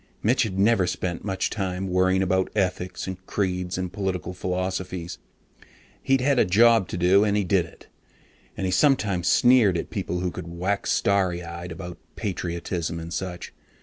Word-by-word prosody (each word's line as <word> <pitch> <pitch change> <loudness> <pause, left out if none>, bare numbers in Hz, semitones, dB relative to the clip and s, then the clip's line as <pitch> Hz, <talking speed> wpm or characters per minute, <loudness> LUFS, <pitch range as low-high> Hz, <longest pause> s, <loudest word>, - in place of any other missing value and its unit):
Mitch 125 +4 +3
had 105 -6 -1
never 100 -2 +3
spent 90 -1 -3
much 95 -2 -2
time 95 -2 -3
worrying 95 +1 +2
about 95 0 +1
ethics 90 -2 -1
and 95 0 -6
creeds 90 -2 -2
and 90 -1 -4
political 90 -3 -3
philosophies. 90 -1 -3 0.8
He'd 135 -1 +2
had 140 -1 +2
a - - +6
job 115 +1 +4
to - - -5
do, 90 +3 +4
and 105 -1 +1
he 105 - +1
did 90 -2 +1
it, - - -18 0.7
and 95 - -2
he 90 - 0
sometimes 95 - +2
sneered 120 -7 +5
at - - -5
people 90 0 -3
who 90 -1 -1
could 90 -1 -7
wax 90 +4 -2
starry 95 -3 +1
eyed 85 +1 -7
about 85 +1 -8 0.2
patriotism 85 -4 -3
and 85 +1 -7
such. 90 -2 -5
95 Hz, 170 wpm, -25 LUFS, 90-100 Hz, 0.8 s, a